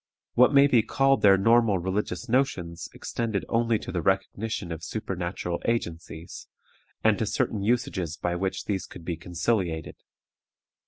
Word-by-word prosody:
What 125 +1 +5
may 140 -1 +7
be 125 -5 +4
called 135 +4 +2
their 100 -1 +7
normal 115 0 +4
religious 95 +7 -2
notions 105 - -1
extended 110 -4 -3
only 115 -1 +2
to - - -7
the 90 -2 -1
recognition 95 +1 -1
of 80 -1 -6
supernatural 90 -4 -4
agencies, 85 -7 -4 0.6
and - - +3
to - - 0
certain 105 - -1
usages 100 -7 -1
by 90 0 -1
which 95 +1 -2
these 95 -3 -2
could 85 - -12
be 85 - -2
conciliated. 85 0 -2
95 Hz, 145 wpm, -26 LUFS, 85-115 Hz, 0.6 s, may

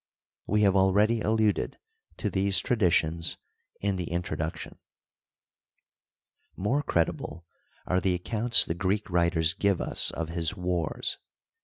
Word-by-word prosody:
We 105 +1 +2
have 100 -1 +4
already 105 +4 +3
alluded 110 -1 +1 0.4
to 105 - -2
these 95 +1 +1
traditions 85 -7 +1 0.4
in 100 -1 0
the 90 -2 -4
introduction. 80 -2 -4 1.8
More 120 +10 0
credible 85 - -2 0.4
are 90 0 +1
the 90 -1 +1
accounts 115 +6 +2
the - - -2
Greek 95 +3 -2
writers 85 -1 +2
give 100 -2 +1
us - - +2
of 80 -1 -4
his 85 +2 -1
wars. 90 -4 -1
95 Hz, 120 wpm, -27 LUFS, 85-105 Hz, 1.8 s, have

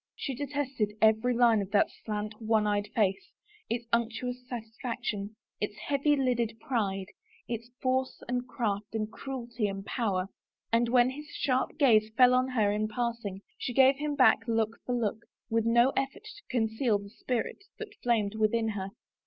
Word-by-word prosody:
She 275 - -3
detested 265 -5 -2
every 220 +3 +4
line 230 -3 +5
of 195 - -5
that 205 - +4
slant, 210 0 -4
one 220 -1 +2
eyed 205 0 0
face, 210 - +1 0.4
its 235 +1 -2
imctuous 235 +2 -1
satisfaction, 220 -3 -4 0.2
its 210 0 -3
heavy 290 +1 +1
lidded 240 -4 0
pride, 200 -6 -1 0.4
its 230 0 -4
force 260 0 0
and 250 0 -2
craft, 215 -4 -2
and 215 -1 -2
cruelty 240 -5 -3
and 195 0 -5
power. 195 -7 -1 0.4
And 230 +1 +3
when 245 +1 +4
his 295 +3 -8
sharp 260 -2 -1
gaze 220 -7 +5
fell 250 -1 +7
on 255 +1 +3
her 220 -6 +2
in 210 +1 0
passing, 225 -4 -3 0.2
she 245 - -3
gave 265 +2 +6
him 295 0 -2
back 260 -3 +6
look 225 -1 0
for 250 - 0
look, 225 -1 -1 0.3
with 225 0 +2
no 235 +3 +5
eflfort 270 +8 -2
to 425 -1 -12
conceal 220 -1 +1
the 200 0 -10
spirit 245 - -3
that 440 -2 -7
flamed 220 -4 +1
within 220 +1 +1
her. 195 -2 -3
230 Hz, 165 wpm, -29 LUFS, 215-255 Hz, 0.4 s, fell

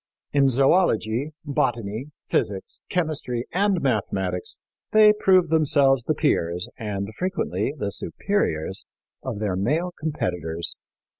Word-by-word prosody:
In 140 -1 +4
zoölogy, 135 - +2 0.2
botany, 120 -4 -1 0.2
physics, 95 -2 -2
chemistry 150 -8 -1
and 195 -1 +2
mathematics 95 -7 -1 0.4
they 215 -1 +8
proved 185 -5 +3
themselves 140 -4 +4
the 155 - +1
peers, 90 - 0
and 100 -2 -4
frequently 150 - -1
the 100 -6 -2
superiors, 95 - -1 0.4
of - - -4
their 100 -3 -1
male 150 - 0
competitors. 90 - -2
130 Hz, 105 wpm, -24 LUFS, 100-160 Hz, 0.4 s, they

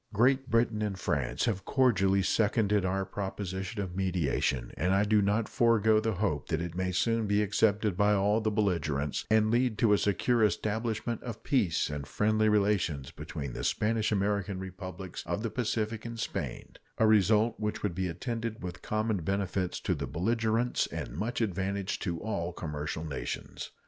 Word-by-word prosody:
Great 130 +4 +3
Britain 115 -1 +2
and 105 -3 -2
France 65 -7 -1
have 100 -5 -1
cordially 100 -8 +3
seconded 105 0 +2
our 95 +1 0
proposition 95 0 -4
of 90 -2 -7
mediation, 85 -9 0
and 90 +4 +1
I 100 - +4
do 105 0 +3
not 105 +3 +1
forego 110 -2 +3
the 110 0 0
hope 90 -7 -1
that 80 - 0
it 85 -1 -4
may 90 +1 -1
soon 115 +4 +1
be 105 +1 +3
accepted 105 -1 +2
by 105 +2 +3
all 105 +2 +2
the 110 - +1
belligerents 85 -9 0
and 110 0 +4
lead 120 -2 +2
to 110 -2 +4
a 105 - +4
secure 115 +3 +2
establishment 110 +2 -1
of 115 -3 -7
peace 105 - +1
and 70 -1 -5
friendly 110 +4 +2
relations 100 -9 +1
between 75 -4 -6
the - - -5
Spanish 110 0 +1
American 100 -1 0
Republics 95 -1 -7
of 105 - -2
the 115 - -2
Pacific 110 -2 -2
and 115 -1 -6
Spain - - -4 0.2
a 110 - +4
result 110 +1 +4
which 105 -1 -3
would 100 -4 0
be 95 +1 -1
attended 115 +5 -4
with 90 -1 -6
common 110 0 0
benefits 95 +1 -1
to 90 - 0
the 70 -4 -4
belligerents 110 - 0
and - - -5
much 120 +3 -3
advantage 100 -1 -1
to 85 -4 -2
all 90 -6 -2
commercial 75 -1 -4
nations. 75 -4 -5
105 Hz, 170 wpm, -30 LUFS, 90-110 Hz, 0.2 s, I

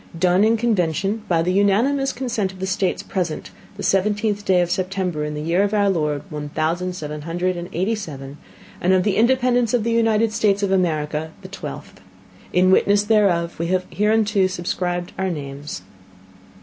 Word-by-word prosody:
Done 180 +3 +3
in 225 +1 +3
Convention 200 -2 0
by 165 -3 +2
the 180 +2 0
Unanimous 235 +8 +2
Consent 235 -6 -2
of 190 - -14
the 190 - -2
States 190 0 -1
present 175 -5 -3 0.3
the 200 - -6
Seventeenth 205 +1 +1
Day 190 -3 +3
of 175 0 -1
September 185 -4 -1
in 150 0 -3
the 150 - -4
Year 170 +4 +2
of 205 +1 +1
our 200 -1 +3
Lord 150 -5 -1
one 150 -1 -5
thousand 170 +4 -1
seven 150 -3 -6
hundred 175 +3 -1
and 175 +1 -6
eighty 190 +7 0
seven 145 -9 -7 0.4
and 185 +2 +3
of 185 -1 +3
the 200 -1 +1
Independence 245 0 +3
of 235 - 0
the 230 - 0
United 225 -1 +2
States 205 -2 +1
of 195 - +1
America 160 -4 0
the - - -7
Twelfth - - -8 0.5
In 185 +1 +4
Witness 205 +2 +3
whereof 185 -7 +2
We 170 - -1
have 185 +1 0
hereunto 210 -2 +2
subscribed 175 -1 -3
our 190 0 0
Names, 145 -2 -6
Go. - - -23
185 Hz, 185 wpm, -21 LUFS, 170-210 Hz, 0.5 s, In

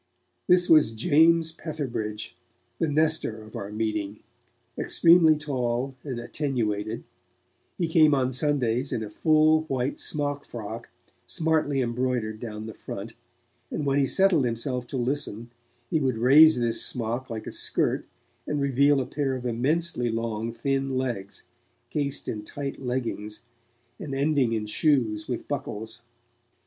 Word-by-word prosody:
This 180 0 +5
was 155 -8 +5
James 160 +7 +4
Petherbridge, 120 -11 -4 0.5
the 165 - +1
Nestor 155 -7 0
of 110 - -13
our 100 +1 -5
meeting, 105 -1 -2 0.6
extremely 165 -2 +5
tall 130 -3 -2
and 130 -5 -4
attenuated; 115 -5 -2 0.7
he 170 - 0
came 155 -2 +5
on 130 -1 0
Sundays 130 -2 0
in 110 - -1
a 105 - -7
full, 155 +3 +4
white 135 -2 -2
smockfrock, 125 -6 -4 0.4
smartly 155 -4 +1
embroidered 120 -3 -1
down 110 -2 -6
the 110 - -7
front, - - -7 0.6
and 150 - -3
when 140 0 +2
he 135 - +3
settled 190 -5 +3
himself 125 +1 -2
to 135 - -4
listen, 120 -3 -3 0.4
he 160 - +3
would 130 -5 0
raise 145 +6 +7
this 115 -1 0
smock 120 +2 -3
like 110 -2 -5
a - - -5
skirt, - - -1 0.4
and 150 - -1
reveal 140 +1 +3
a - - -3
pair 140 -1 -1
of 125 -1 -6
immensely 125 +2 0
long 115 0 -2
thin 135 +2 -1
legs, 115 -7 -4 0.5
cased 140 -2 -2
in 105 -1 -4
tight 140 +5 -6
leggings, 120 -4 -4 0.5
and 140 -3 -5
ending 140 -3 +2
in 110 -2 -1
shoes 110 -3 +1
with - - -4
buckles. 110 +3 -5
130 Hz, 135 wpm, -26 LUFS, 115-145 Hz, 0.7 s, raise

